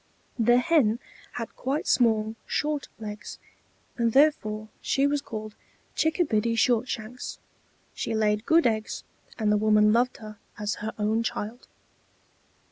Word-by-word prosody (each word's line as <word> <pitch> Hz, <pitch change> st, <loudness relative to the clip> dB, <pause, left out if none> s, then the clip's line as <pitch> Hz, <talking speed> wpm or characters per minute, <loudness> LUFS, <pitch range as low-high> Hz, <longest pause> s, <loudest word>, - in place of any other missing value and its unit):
The 240 Hz, +2 st, +5 dB
Hen 250 Hz, -5 st, +3 dB, 0.4 s
had 230 Hz, -2 st, -6 dB
quite 275 Hz, +4 st, -2 dB
small, 220 Hz, -3 st, +2 dB
short 300 Hz, -1 st, -1 dB
legs, 210 Hz, -1 st, -7 dB, 0.6 s
and 230 Hz, -2 st, +1 dB
therefore 215 Hz, -7 st, +2 dB
she 275 Hz, -, +1 dB
was 285 Hz, 0 st, +1 dB
called 215 Hz, -4 st, -7 dB, 0.4 s
Chickabiddy 235 Hz, -, +1 dB
Shortshanks; 235 Hz, 0 st, -1 dB, 0.6 s
she 225 Hz, -, -3 dB
laid 210 Hz, 0 st, +1 dB
good 330 Hz, +1 st, +5 dB
eggs, 220 Hz, -2 st, -1 dB, 0.3 s
and 215 Hz, -2 st, +1 dB
the 210 Hz, -, +4 dB
woman 210 Hz, 0 st, +4 dB
loved 245 Hz, +2 st, +2 dB
her 215 Hz, -1 st, -10 dB, 0.2 s
as 210 Hz, 0 st, -2 dB
her 220 Hz, +1 st, -4 dB
own 215 Hz, +2 st, +1 dB
child. 230 Hz, +1 st, -4 dB
225 Hz, 125 wpm, -27 LUFS, 215-250 Hz, 0.6 s, The